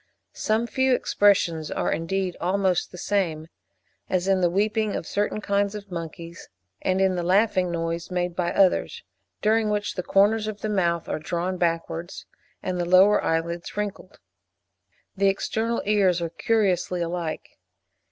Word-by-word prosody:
Some 220 +2 0
few 260 +1 +2
expressions 175 -9 +2
are, - - -1
indeed, 185 +2 -2
almost 185 0 +1
the 180 - -10
same, 170 -5 -1 0.6
as 185 0 0
in 190 -1 +3
the 175 - +3
weeping 210 +3 0
of - - -4
certain 210 +1 -1
kinds 200 0 0
of 200 -2 -9
monkeys 170 0 -7 0.3
and 185 0 +1
in 190 -1 +3
the 180 - -1
laughing 185 0 +2
noise 165 0 -3
made 180 -1 -2
by 175 -1 0
others, 190 -2 +2 0.4
during 220 0 +3
which 210 0 -1
the 180 - -3
corners 210 +4 +2
of 210 -1 -6
the 215 - -2
mouth 170 -5 0
are - - -2
drawn 175 +3 -2
backwards, 165 0 -2 0.4
and 185 -1 -2
the 175 - 0
lower 190 +3 +6
eyelids 170 +3 -2
wrinkled. 205 -2 -5 1.0
The 200 0 +2
external 225 +4 -1
ears 195 -4 +3
are 170 -1 -2
curiously 185 -3 0
alike. 170 -1 -5
185 Hz, 150 wpm, -25 LUFS, 170-205 Hz, 1.0 s, lower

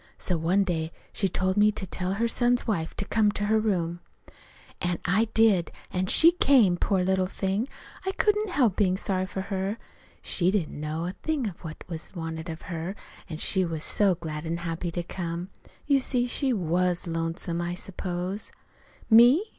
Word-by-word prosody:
So 180 - -1
one 175 +5 +2
day 165 -3 -2 0.2
she 195 - 0
told 185 +2 0
me 210 +1 +5
to 200 - -5
tell 185 +1 -2
her 230 +4 +1
son's 245 +1 +2
wife 165 -8 -2
to 200 - -3
come 210 0 +2
to 205 - -2
her 220 +1 +3
in - - +2
her 220 - +2
room. 170 -3 -1 0.8
"An' 175 -1 0
I 195 +5 +3
did, 215 -6 +4 0.2
an' 185 0 -1
she 330 - +7
came. 260 - +4
Poor 185 +1 +1
little 185 0 +1
thing! 195 +5 -1 0.4
I 380 - -1
couldn't 420 0 +1
help 255 - +2
bein' 185 -3 +2
sorry 185 -1 -1
for 190 - -4
her. 195 +2 -2 0.5
She 175 0 +1
didn't 185 -7 -1
know 155 +2 -3
a 180 - -3
thing 305 -7 -1
of 185 - -8
what 155 -2 -8
was 170 +1 -7
wanted 165 0 -5
of 160 0 -7
her, 170 +2 -4 0.3
an' 160 - -5
she 190 +3 +2
was 165 -3 -3
so 200 -3 +3
glad 155 -2 -6
an' 165 +1 -2
happy 170 0 -3
to 175 +1 -3
come. 175 +1 -5 0.3
You 280 -2 +4
see, 250 -2 0
she 265 +2 0
was 180 -3 0
lonesome, 165 +1 -1
I 175 +1 -2
suppose. 180 +1 -4 0.6
"'Me? 240 - +7
185 Hz, 190 wpm, -27 LUFS, 170-215 Hz, 0.8 s, she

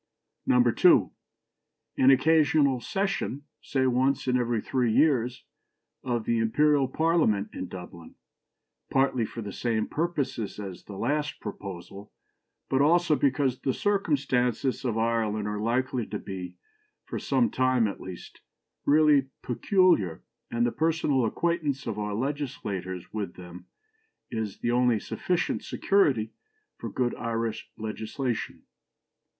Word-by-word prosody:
"2. 125 -2 +5 0.8
An 130 - +5
occasional 145 -1 +4
session 195 - -2 0.2
(say 130 -2 0
once 130 +2 +1
in 125 - +2
every 120 -2 +1
three 125 +1 0
years) 125 -2 +2 0.6
of 120 -3 -1
the 115 -1 +1
Imperial 140 +5 +3
Parliament 150 -9 +1
in 95 - -5
Dublin, 90 -2 -10 0.7
partly 135 -3 +2
for 115 +1 -7
the 100 - -6
same 115 -3 0
purposes 140 - -2
as 95 -3 -7
the 100 - -9
last 145 +6 -1
proposal, 100 +2 -8 0.6
but 135 - +2
also 165 +1 +4
because 135 -2 +1
the 130 - -1
circumstances 140 - 0
of 120 -4 -1
Ireland 110 -2 0
are 105 0 -3
likely 125 +1 0
to 105 - -4
be, 95 -2 -7 0.5
for - - -4
some 240 - +1
time 130 -3 +2
at 100 - -6
least, 95 -1 -10 0.5
really 150 -2 +5 0.2
peculiar, 125 - +2 0.3
and 120 0 +1
the 120 - +1
personal 155 -5 +1
acquaintance 150 +1 -1
of 110 -3 -3
our 105 -1 -2
legislators 100 - -4
with 100 -5 -4
them 90 0 -11 0.6
is 110 -4 -4
the 120 - 0
only 120 -2 +3
sufficient 180 - -2
security 130 - +1 0.5
for - - -5
good 125 -1 0
Irish 115 -1 -3
legislation. 110 +3 -4
125 Hz, 125 wpm, -27 LUFS, 110-145 Hz, 0.8 s, 2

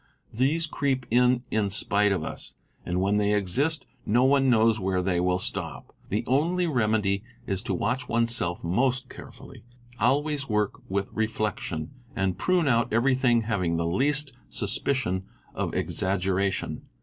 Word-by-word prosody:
These 140 +8 +2
creep 135 -5 -1
in 125 +1 +4
in 105 -2 +1
spite 105 +1 +2
of 95 -5 0
us, - - -6 0.3
and 90 +1 -2
when 100 +2 +2
they 105 0 +2
exist 135 - 0 0.2
no 120 +4 +2
one 135 0 +4
knows 110 -2 +4
wheré 95 -2 0
they 90 -2 +1
will 90 0 +2
stop. - - -3 0.2
The 105 - 0
only 170 +8 +1
remedy 110 - +1 0.2
is 95 -3 -1
to - - -2
watch 125 +3 -2
oneself 115 -7 +1
most 125 +8 0
carefully, - - -12 0.4
always 145 0 +1
work 105 -1 0
with 100 +1 -2
reflection, 110 -7 -2 0.2
and 95 -1 0
prune 180 - +1
out 115 -2 +2
everything 125 0 +3
having 90 -7 0
the 85 - -1
least 140 - +1 0.2
suspicion 95 - 0 0.3
of - - -3
exaggeration. 95 0 -1
110 Hz, 145 wpm, -26 LUFS, 95-130 Hz, 0.4 s, in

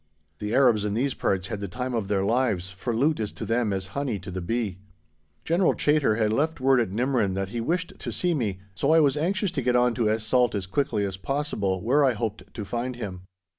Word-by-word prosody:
The 105 +2 -2
Arabs 120 -6 +4
in 105 0 -1
these 130 +3 0
parts 95 -1 -1
had 105 - -3
the 100 - -4
time 125 +6 -4
of 110 -4 -1
their 100 -1 +1
lives, 105 -5 +1
for 95 +6 -4
loot 145 +5 +2
is 105 -1 -2
to - - -6
them 115 -2 +1
as 95 -1 -3
honey 140 -6 -1
to 95 +1 -7
the 95 0 -4
bee. 100 0 -2 0.7
General 170 +3 +3
Chaytor 150 -7 +2
had 110 -1 +2
left 155 +6 0
word 130 0 +4
at 115 - +1
Nimrin 115 -2 0
that 95 0 -2
he 115 +2 -3
wished 175 +8 -1
to - - -4
see 180 -1 0
me, 110 - -1 0.2
so 140 +11 +2
I - - +7
was 145 -3 +4
anxious 185 +5 0
to - - -2
get 125 0 +1
on 125 0 +4
to 115 -3 +1
Es 110 0 0
Salt 120 0 +2
as 100 -2 -2
quickly 105 0 0
as 95 -1 -4
possible, 100 -7 -2
where 140 +6 +3
I 130 -3 +4
hoped 110 -1 -4
to 105 - -6
find 120 +4 -3
him. 100 -6 -6
115 Hz, 240 wpm, -26 LUFS, 100-135 Hz, 0.7 s, I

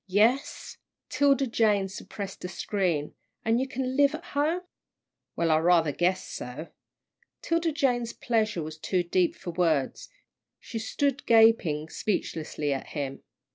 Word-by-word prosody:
"Yes." 220 +8 +1 0.3
'Tilda 275 0 +3
Jane 215 -5 +2
suppressed 195 0 -7
a - - -2
scream. 180 -5 -1 0.3
"An' 225 +2 +3
you 265 - -1
can 260 0 -3
live 285 +2 +4
at 325 - -8
home?" 310 +4 0 0.7
"Well, 165 -1 +1
I 155 - +4
rather 165 -2 +4
guess 180 +5 0
so." 140 +7 -7 0.7
'Tilda 335 0 +1
Jane's 245 -6 0
pleasure 215 -9 0
was 155 +1 -7
too 180 +2 0
deep 175 0 +1
for 175 - -6
words. 165 -6 0 0.5
She 230 - -6
stood 280 +5 -1
gaping 220 -10 +4
speechlessly 155 -7 -2
at 135 - -5
him. 140 -3 -5
205 Hz, 135 wpm, -27 LUFS, 165-260 Hz, 0.7 s, live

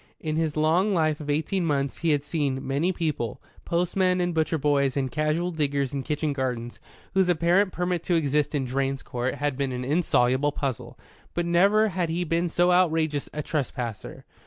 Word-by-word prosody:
In 155 -1 -3
his 160 -1 -1
long 175 +6 +2
life 155 -3 +1
of 150 -1 -7
eighteen 160 +6 0
months 140 -4 -1
he 170 - 0
had 145 -2 +2
seen 145 -4 -2
many 145 +7 +1
people, 155 - -2 0.3
postmen 180 +1 +1
and 175 -1 0
butcher 160 0 +1
boys 140 -2 +1
and 130 -2 -1
casual 155 +5 0
diggers 140 -4 -1
in 140 - -2
kitchen 150 +1 -1
gardens, 125 -3 -3 0.3
whose 190 -2 +3
apparent 180 +3 +3
permit 180 0 -1
to 175 - +2
exist 150 -1 +1
in 135 -2 0
Drane's 135 +1 -2
Court 125 0 -2
had 145 -2 -1
been 135 0 -1
an 125 0 -4
insoluble 140 -2 +2
puzzle; 135 -6 -4 0.4
but 175 +1 0
never 200 +6 +4
had 180 -3 -1
he 175 +2 -1
seen 170 +2 0
so 175 +2 +3
outrageous 160 -5 +2
a 150 - -4
trespasser. 125 -8 -4
155 Hz, 180 wpm, -26 LUFS, 140-175 Hz, 0.4 s, never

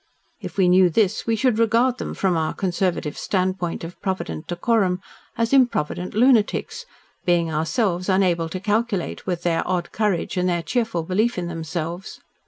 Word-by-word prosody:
If - - -8
we 190 -2 +4
knew 180 0 +5
this, 195 +4 +1
we 225 - +2
should 230 0 +1
regard 235 +3 +3
them - - -4
from 190 -3 +1
our 160 -1 -1
conservative 180 -5 -1
standpoint 185 -3 -1
of 165 +2 -9
provident 135 - -3
decorum 185 0 +1 0.4
as 230 +2 0
improvident 200 - +1
lunatics, 250 - +2 0.4
being 170 -2 +1
ourselves 180 +4 0
unable 180 -4 +2
to 185 - -4
calculate 210 -2 -1
with 175 -2 -2
their 165 -2 +1
odd 180 -2 -1
courage 205 -5 -1
and 180 0 +1
their 170 -1 0
cheerful 225 -2 -1
belief 210 +7 0
in 180 - -2
themselves. 170 +1 -5
185 Hz, 160 wpm, -22 LUFS, 170-220 Hz, 0.4 s, knew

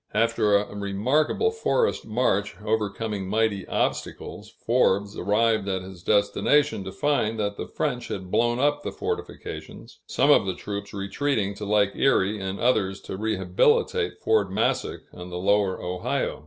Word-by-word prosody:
After 115 -3 +3
a 100 0 -4
remarkable 125 - +1
forest 455 - 0
march, 105 -3 0
overcoming 105 -2 -2
mighty 110 -2 0
obstacles, - - -3 0.2
Forbes 100 +2 +2
arrived 110 +1 +1
at 95 -1 -1
his 95 -2 -11
destination 105 - +2
to 95 - -5
find 115 -2 0
that 100 -1 -1
the - - -6
French - - -2
had 95 -1 -6
blown 120 0 +2
up 145 +1 +2
the - - -4
fortifications, - - -6
some - - +3
of - - +5
the 95 - -1
troops 100 +2 -6
retreating 100 +1 -1
to 105 +1 -7
Lake 100 -1 +3
Erie 105 -6 +2
and 95 0 -4
others 100 -6 +1
to - - -6
rehabilitate 95 -3 +1
Fort - - +2
Massac - - 0
on 90 0 -9
the 90 - -5
Lower 100 0 +2
Ohio. 90 0 -2
100 Hz, 150 wpm, -25 LUFS, 95-115 Hz, 0.2 s, of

